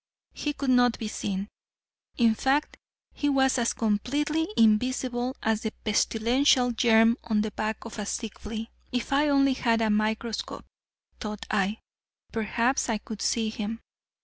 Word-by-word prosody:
He 295 Hz, -, -3 dB
could 275 Hz, -2 st, -1 dB
not 245 Hz, -1 st, +4 dB
be 220 Hz, -, -4 dB
seen. 200 Hz, -2 st, -3 dB, 0.7 s
In 230 Hz, -2 st, +4 dB
fact 270 Hz, +6 st, 0 dB, 0.4 s
he 290 Hz, -, -1 dB
was 265 Hz, -2 st, +3 dB
as 235 Hz, -, +2 dB
completely 290 Hz, +9 st, 0 dB
invisible 245 Hz, +3 st, +2 dB
as 220 Hz, -1 st, +1 dB
the 220 Hz, -, -3 dB
pestilential 245 Hz, +4 st, +2 dB
germ 225 Hz, 0 st, +4 dB
on 215 Hz, -2 st, +1 dB
the 215 Hz, 0 st, -2 dB
back 215 Hz, +2 st, -3 dB
of 230 Hz, -, -8 dB
a 205 Hz, -, -3 dB
sick 225 Hz, -1 st, -4 dB
flea. 225 Hz, +1 st, -6 dB, 0.2 s
"If 245 Hz, +2 st, -2 dB
I 290 Hz, +2 st, +3 dB
only 275 Hz, -1 st, +4 dB
had 230 Hz, -3 st, +1 dB
a 220 Hz, -1 st, +2 dB
microscope," 220 Hz, +1 st, -2 dB, 0.5 s
thought 210 Hz, +1 st, -5 dB
I, 210 Hz, +1 st, 0 dB, 0.5 s
"perhaps 230 Hz, +4 st, 0 dB
I 225 Hz, -, +1 dB
could 210 Hz, 0 st, -8 dB
see 225 Hz, -2 st, +1 dB
him." 220 Hz, +1 st, -4 dB
230 Hz, 150 wpm, -27 LUFS, 215-255 Hz, 0.7 s, not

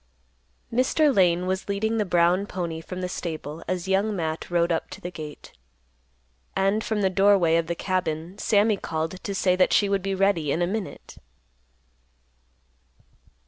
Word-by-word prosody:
Mr. 270 Hz, +3 st, +3 dB
Lane 180 Hz, -1 st, +3 dB
was 190 Hz, +2 st, -2 dB
leading 220 Hz, +3 st, 0 dB
the 210 Hz, -, +1 dB
brown 175 Hz, +2 st, +2 dB
pony 170 Hz, -4 st, -4 dB
from 185 Hz, +3 st, -7 dB
the 180 Hz, -, -2 dB
stable 160 Hz, -3 st, -5 dB
as 185 Hz, 0 st, -2 dB
Young 200 Hz, +2 st, +1 dB
Matt 160 Hz, -3 st, -3 dB
rode 170 Hz, 0 st, +2 dB
up 165 Hz, -, -1 dB
to -, -, -9 dB
the 175 Hz, -, -6 dB
gate; 150 Hz, -3 st, -9 dB, 1.0 s
and 195 Hz, +3 st, +1 dB
from 215 Hz, -2 st, -1 dB
the 190 Hz, -, +3 dB
doorway 195 Hz, -4 st, +4 dB
of 165 Hz, -1 st, +1 dB
the 170 Hz, -, -2 dB
cabin 175 Hz, -2 st, -2 dB
Sammy 210 Hz, 0 st, +3 dB
called 160 Hz, +1 st, -4 dB
to 200 Hz, -, -3 dB
say 185 Hz, -1 st, +2 dB
that 185 Hz, -, +3 dB
she 205 Hz, -, +4 dB
would 200 Hz, -1 st, +1 dB
be 195 Hz, +1 st, -2 dB
ready 190 Hz, -6 st, +1 dB
in 175 Hz, -, +1 dB
a -, -, +3 dB
minute. 200 Hz, +2 st, -6 dB
185 Hz, 165 wpm, -25 LUFS, 170-200 Hz, 1.0 s, doorway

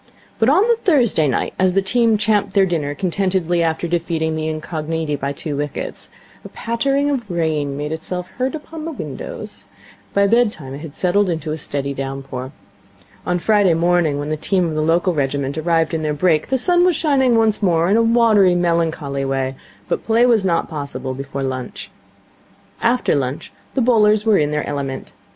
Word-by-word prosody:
But 225 Hz, -, +4 dB
on 340 Hz, +8 st, +5 dB
the 470 Hz, -1 st, +3 dB
Thursday 240 Hz, -, +3 dB
night, 130 Hz, -, -1 dB
as 185 Hz, -1 st, +3 dB
the 195 Hz, -, +3 dB
team 230 Hz, +2 st, +2 dB
champed 210 Hz, -1 st, +1 dB
their 195 Hz, -1 st, +5 dB
dinner 150 Hz, -5 st, -2 dB
contentedly 185 Hz, -2 st, 0 dB
after 165 Hz, +1 st, 0 dB
defeating 165 Hz, -2 st, -1 dB
the 155 Hz, 0 st, -2 dB
Incogniti 155 Hz, 0 st, -3 dB
by 140 Hz, 0 st, -3 dB
two 145 Hz, +1 st, -5 dB
wickets, 145 Hz, 0 st, -4 dB, 0.3 s
a -, -, -9 dB
pattering 275 Hz, +5 st, 0 dB
of 240 Hz, -7 st, -3 dB
rain 155 Hz, -5 st, -1 dB
made 150 Hz, +1 st, -4 dB
itself 180 Hz, +3 st, -4 dB
heard 260 Hz, +4 st, 0 dB
upon 315 Hz, +1 st, -8 dB
the 325 Hz, -, -4 dB
windows. -, -, -7 dB, 0.5 s
By 200 Hz, 0 st, +4 dB
bedtime 210 Hz, -, +1 dB
it 140 Hz, -, -7 dB
had 155 Hz, -1 st, -9 dB
settled 180 Hz, -2 st, +1 dB
to 155 Hz, 0 st, -5 dB
a 155 Hz, -, -2 dB
steady 140 Hz, -1 st, -3 dB
downpour. 135 Hz, -1 st, -5 dB, 0.8 s
On 180 Hz, -, +1 dB
Friday 200 Hz, -2 st, +3 dB
morning, 170 Hz, -3 st, +2 dB
when 145 Hz, +1 st, -4 dB
the 155 Hz, -, -1 dB
team 185 Hz, +3 st, 0 dB
of 165 Hz, -, -2 dB
the 155 Hz, -, -1 dB
local 170 Hz, +3 st, +2 dB
regiment 140 Hz, -1 st, -1 dB
arrived 165 Hz, 0 st, +1 dB
in 160 Hz, -, -1 dB
their 150 Hz, -1 st, -1 dB
brake, 155 Hz, 0 st, +2 dB
the 265 Hz, -, +1 dB
sun 350 Hz, +6 st, +3 dB
was 360 Hz, -2 st, +3 dB
shining 270 Hz, -6 st, +2 dB
once 220 Hz, -2 st, +2 dB
more 170 Hz, -4 st, +2 dB
in 200 Hz, -, +3 dB
a 230 Hz, -, +4 dB
watery, 225 Hz, -5 st, +4 dB
melancholy 165 Hz, -5 st, 0 dB
way, 135 Hz, -1 st, -1 dB, 0.3 s
but -, -, -2 dB
play 230 Hz, +2 st, +4 dB
was 230 Hz, -5 st, +3 dB
not 170 Hz, -3 st, +1 dB
possible 140 Hz, -4 st, -5 dB
before 135 Hz, +1 st, -5 dB
lunch. 130 Hz, -2 st, -5 dB, 0.9 s
After 240 Hz, +2 st, +2 dB
lunch 135 Hz, -1 st, -3 dB, 0.2 s
the 265 Hz, -, +2 dB
bowlers 215 Hz, -3 st, +3 dB
were 215 Hz, -3 st, +4 dB
in 150 Hz, -1 st, +1 dB
their 150 Hz, 0 st, -1 dB
element. 140 Hz, -2 st, -4 dB
170 Hz, 185 wpm, -19 LUFS, 150-215 Hz, 0.9 s, on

